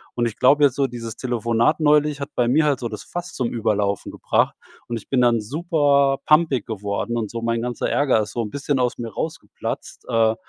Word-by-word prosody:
Und 120 Hz, -1 st, +1 dB
ich 110 Hz, -, -7 dB
glaube 145 Hz, +3 st, +4 dB
jetzt 130 Hz, -, +2 dB
so, 140 Hz, -1 st, +1 dB
dieses 115 Hz, -2 st, -7 dB
Telefonat 120 Hz, +3 st, +1 dB
neulich 150 Hz, -1 st, +3 dB
hat 140 Hz, -, -4 dB
bei 120 Hz, -1 st, +2 dB
mir 150 Hz, +5 st, +3 dB
halt 140 Hz, -4 st, +1 dB
so 120 Hz, -, -3 dB
das 105 Hz, -2 st, -7 dB
Fass 175 Hz, 0 st, -6 dB
zum 125 Hz, -3 st, -1 dB
Überlaufen 105 Hz, -3 st, -1 dB
gebracht. -, -, 0 dB, 0.3 s
Und 120 Hz, -1 st, -3 dB
ich 105 Hz, -, -12 dB
bin 130 Hz, -2 st, +2 dB
dann 120 Hz, -2 st, +3 dB
super 140 Hz, -, +2 dB
pampig 150 Hz, -6 st, +3 dB
geworden 105 Hz, +2 st, -3 dB
und 110 Hz, -3 st, -2 dB
so 115 Hz, 0 st, -4 dB
mein 115 Hz, 0 st, 0 dB
ganzer 125 Hz, 0 st, -2 dB
Ärger 135 Hz, -6 st, +2 dB
ist 105 Hz, 0 st, -5 dB
so 120 Hz, -, -1 dB
'n 105 Hz, -, -5 dB
bisschen 140 Hz, -1 st, -1 dB
aus 125 Hz, -1 st, 0 dB
mir 115 Hz, -1 st, -4 dB
rausgeplatzt. 160 Hz, -, -5 dB
Äh, 110 Hz, -1 st, +3 dB
120 Hz, 215 wpm, -22 LUFS, 115-145 Hz, 0.3 s, glaube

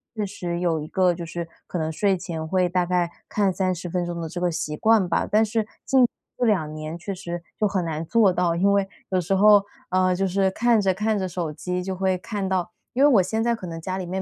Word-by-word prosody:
确 210 Hz, -1 st, -1 dB
实 175 Hz, -2 st, -4 dB
有 170 Hz, -3 st, +1 dB
一 155 Hz, -, -6 dB
个 185 Hz, -1 st, +2 dB
就 170 Hz, 0 st, -6 dB
是 170 Hz, 0 st, -5 dB, 0.2 s
可 -, -, -4 dB
能 160 Hz, -1 st, -1 dB
睡 195 Hz, +3 st, +1 dB
前 170 Hz, -3 st, -5 dB
会 185 Hz, 0 st, +2 dB
大 180 Hz, 0 st, +1 dB
概 175 Hz, -1 st, +1 dB, 0.2 s
看 200 Hz, -3 st, +1 dB
30 185 Hz, -2 st, -1 dB
分 175 Hz, +1 st, -1 dB
钟 170 Hz, -1 st, -4 dB
的 165 Hz, -, -3 dB
这 175 Hz, +2 st, -6 dB
个 180 Hz, -1 st, +1 dB
习 150 Hz, -1 st, -3 dB
惯 220 Hz, +2 st, +3 dB
吧。 170 Hz, -, 0 dB
但 215 Hz, +1 st, +4 dB
是 220 Hz, 0 st, -1 dB, 0.2 s
近 260 Hz, -2 st, +5 dB, 0.3 s
这 245 Hz, -, 0 dB
2 170 Hz, -9 st, +1 dB
年 155 Hz, +2 st, -6 dB
确 195 Hz, +3 st, -5 dB
实 175 Hz, -1 st, -6 dB, 0.2 s
就 210 Hz, -, +3 dB
很 190 Hz, -3 st, -1 dB
难 160 Hz, 0 st, -3 dB
做 200 Hz, +1 st, +3 dB
到， 175 Hz, -2 st, +1 dB
因 195 Hz, +4 st, +3 dB
为 200 Hz, -1 st, +2 dB, 0.2 s
有 185 Hz, -1 st, +1 dB
时 185 Hz, +3 st, 0 dB
候， 205 Hz, 0 st, +6 dB, 0.3 s
呃， 185 Hz, 0 st, +3 dB
就 195 Hz, +1 st, 0 dB
是 190 Hz, +1 st, +2 dB
看 230 Hz, +2 st, +2 dB
着 190 Hz, -2 st, +1 dB
看 215 Hz, +1 st, 0 dB
着 185 Hz, -1 st, -2 dB
手 170 Hz, -3 st, -3 dB
机 180 Hz, +3 st, -3 dB
就 190 Hz, 0 st, -3 dB
会 185 Hz, 0 st, +1 dB
看 200 Hz, 0 st, -4 dB
到 180 Hz, -2 st, -1 dB, 0.2 s
因 260 Hz, -, 0 dB
为 290 Hz, -, +7 dB
我 215 Hz, -9 st, +5 dB
现 220 Hz, +5 st, -1 dB
在 235 Hz, 0 st, +2 dB
可 190 Hz, -, -9 dB
能 165 Hz, -1 st, -6 dB
家 185 Hz, +2 st, -3 dB
里 185 Hz, -, -4 dB
面 185 Hz, +2 st, -3 dB
185 Hz, 265 characters per minute, -24 LUFS, 175-200 Hz, 0.3 s, 为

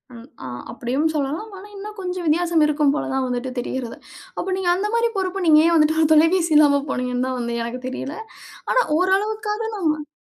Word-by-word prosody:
ம். 230 Hz, +2 st, -12 dB, 0.2 s
ஆ. -, -, -6 dB, 0.2 s
அப்டியும் 260 Hz, +6 st, -1 dB
சொல்லலாம். 305 Hz, +9 st, -3 dB
ஆனா 390 Hz, +2 st, -11 dB
இன்னும் 420 Hz, +2 st, -8 dB
கொஞ்சம் 360 Hz, -1 st, -4 dB
வித்தியாசம் 330 Hz, +1 st, +2 dB
இருக்கும் 300 Hz, -1 st, +2 dB
போல 300 Hz, -, -2 dB
தான் 265 Hz, -1 st, 0 dB
வந்துட்டு 250 Hz, +1 st, -3 dB
தெரியறது. 245 Hz, -1 st, -4 dB, 0.4 s
அப்ப -, -, -3 dB
நீங்க 375 Hz, -2 st, 0 dB
அந்த 390 Hz, +3 st, -1 dB
மாரி 465 Hz, 0 st, +2 dB
பொறுப்பு. 380 Hz, 0 st, -2 dB
நீங்க 305 Hz, -1 st, +7 dB
ஏன் 340 Hz, -, +3 dB
வந்துட்டு 315 Hz, 0 st, +3 dB
ஒரு 315 Hz, -, +4 dB
தொலைபேசி 330 Hz, +2 st, +3 dB
இல்லாம 285 Hz, -2 st, +5 dB
போனீங்கன்தா 250 Hz, 0 st, -1 dB
வந்து 235 Hz, -1 st, -3 dB
எனக்குத 245 Hz, +2 st, -5 dB
தெரியல. 270 Hz, +3 st, -5 dB, 0.6 s
ஆனா -, -, +4 dB, 0.2 s
ஓரளவுக்காது 390 Hz, +4 st, +1 dB, 0.6 s
நம்ம. 300 Hz, -1 st, -7 dB
305 Hz, 180 wpm, -21 LUFS, 260-365 Hz, 0.6 s, நீங்க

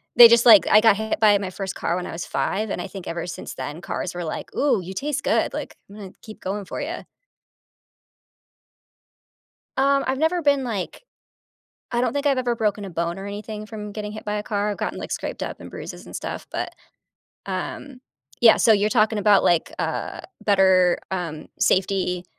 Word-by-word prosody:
they 240 Hz, 0 st, +11 dB
just 235 Hz, 0 st, +4 dB
like 220 Hz, -5 st, +8 dB
I 210 Hz, -, +7 dB
got 225 Hz, -2 st, +6 dB
hit 220 Hz, 0 st, -2 dB
by 210 Hz, -2 st, +6 dB
my 195 Hz, -2 st, -4 dB
1st 190 Hz, 0 st, -5 dB
car 170 Hz, -, -1 dB
when 180 Hz, -, -3 dB
I -, -, -6 dB
was 170 Hz, +1 st, -5 dB
5, 215 Hz, +2 st, -1 dB
and -, -, -3 dB
I -, -, -5 dB
think 190 Hz, -1 st, -9 dB
ever 170 Hz, 0 st, -4 dB
since 175 Hz, -, -7 dB
then, 150 Hz, +4 st, -6 dB
cars 180 Hz, -, -4 dB
were 175 Hz, -, -4 dB
like, 155 Hz, -, -6 dB
"Ooh, 285 Hz, -6 st, +2 dB
you 185 Hz, +2 st, -7 dB
taste 285 Hz, +7 st, -3 dB
good. -, -, +1 dB
Like, -, -, -6 dB
I’m 200 Hz, -, -12 dB
gonna 195 Hz, -3 st, -9 dB
keep 215 Hz, -, -11 dB
going 200 Hz, +1 st, -3 dB
for -, -, -5 dB
ya." 325 Hz, +5 st, -4 dB, 2.8 s
Um, 275 Hz, +1 st, +3 dB
I’ve 260 Hz, 0 st, 0 dB
never 330 Hz, +3 st, +1 dB
been, 285 Hz, -3 st, +2 dB
like 215 Hz, -7 st, -3 dB, 1.0 s
I 240 Hz, -, +1 dB
don’t 250 Hz, -, +1 dB
think 285 Hz, 0 st, -2 dB
I’ve 275 Hz, -2 st, +3 dB
ever 240 Hz, -1 st, +1 dB
broken 210 Hz, -2 st, -1 dB
a 195 Hz, -, -7 dB
bone 170 Hz, +2 st, -2 dB
or 195 Hz, -, -7 dB
anything 210 Hz, +1 st, -6 dB
from 210 Hz, -1 st, -7 dB
getting 210 Hz, 0 st, -4 dB
hit 215 Hz, -, -8 dB
by -, -, -1 dB
a 210 Hz, -, -2 dB
car, 205 Hz, -1 st, 0 dB
I’ve 205 Hz, -, -4 dB
gotten, -, -, -3 dB
like, -, -, -7 dB
scraped -, -, -6 dB
up -, -, -4 dB
and -, -, -10 dB
bruises -, -, -8 dB
and -, -, -12 dB
stuff. -, -, -5 dB
But, -, -, -2 dB, 0.9 s
um -, -, -4 dB, 0.6 s
Yeah, -, -, +7 dB
so 225 Hz, -, +7 dB
you’re 210 Hz, +1 st, +2 dB
talking 215 Hz, 0 st, +2 dB
about, 205 Hz, -2 st, +6 dB
like, 170 Hz, -2 st, +1 dB, 0.2 s
uh, -, -, -4 dB, 0.3 s
better, 190 Hz, -1 st, +5 dB, 0.4 s
um, 165 Hz, -3 st, -4 dB, 0.3 s
safety, 185 Hz, -1 st, 0 dB
210 Hz, 205 wpm, -23 LUFS, 190-230 Hz, 2.8 s, they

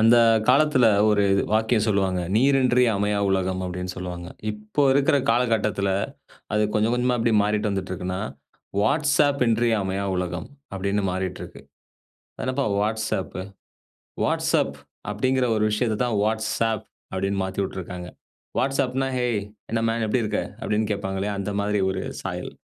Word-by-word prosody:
அந்த 115 Hz, +2 st, +6 dB, 0.3 s
காலத்தில 130 Hz, -2 st, +5 dB, 0.2 s
ஒரு 105 Hz, -1 st, +3 dB, 0.3 s
வாக்கியம் 110 Hz, 0 st, +2 dB
சொல்லுவாங்க. 95 Hz, -3 st, +1 dB
"நீரின்றி 125 Hz, 0 st, +4 dB
அமையா 105 Hz, +1 st, 0 dB
உலகம்" 95 Hz, -1 st, 0 dB
அப்படின்னு 90 Hz, 0 st, -4 dB
சொல்லுவாங்க. 90 Hz, -1 st, -6 dB, 0.2 s
இப்போ 105 Hz, +6 st, -2 dB
இருக்கிற 140 Hz, +1 st, +3 dB
காலகட்டத்தில 110 Hz, -4 st, +1 dB, 0.6 s
அது 105 Hz, 0 st, +3 dB
கொஞ்சம் 110 Hz, +2 st, +2 dB
கொஞ்சமா 125 Hz, 0 st, +1 dB, 0.2 s
மாறிட்டு 105 Hz, +1 st, 0 dB
வந்துட்டு 95 Hz, -2 st, -3 dB
இருக்குன்னா, 90 Hz, +1 st, -3 dB, 0.6 s
"வாட்ஸ்அப் 145 Hz, +3 st, +2 dB
இன்றி 115 Hz, +1 st, +2 dB
அமையா 95 Hz, +1 st, -2 dB
உலகம்" 90 Hz, -1 st, -3 dB, 0.3 s
அப்படின்னு 100 Hz, +1 st, -1 dB
மாறிட்டிருக்கு. 95 Hz, 0 st, -5 dB, 0.8 s
"அது -, -, -7 dB
என்னப்பா 130 Hz, +1 st, 0 dB
வாட்ஸ்அப்பு? 105 Hz, -3 st, -1 dB, 0.8 s
வாட்ஸ்அப் -, -, +1 dB, 0.3 s
அப்படிங்கிற 130 Hz, +4 st, +1 dB
ஒரு 105 Hz, -, +1 dB
விஷயத்த 110 Hz, 0 st, 0 dB
தான் 120 Hz, -3 st, -1 dB
வாட்ஸ்ஆப் 110 Hz, 0 st, 0 dB, 0.3 s
அப்படின்னு 95 Hz, +1 st, -1 dB
மாத்திவுட்டிருக்காங்க" 95 Hz, -2 st, -4 dB, 0.5 s
வாட்ஸ்அப்னா, 135 Hz, 0 st, 0 dB
"ஹேய் 120 Hz, -4 st, 0 dB, 0.3 s
என்ன 115 Hz, -, +1 dB
மேன் 115 Hz, 0 st, 0 dB
எப்படி 115 Hz, +3 st, +1 dB
இருக்க?" 105 Hz, 0 st, -1 dB, 0.2 s
அப்படின்னு 110 Hz, 0 st, 0 dB
கேட்பாங்க 95 Hz, -1 st, -3 dB
இல்லையா? 100 Hz, +1 st, -2 dB
அந்த 100 Hz, +1 st, -3 dB
மாரி 105 Hz, 0 st, 0 dB
ஒரு 95 Hz, 0 st, -2 dB, 0.2 s
சாயல். -, -, -5 dB
105 Hz, 130 wpm, -24 LUFS, 95-120 Hz, 0.8 s, அந்த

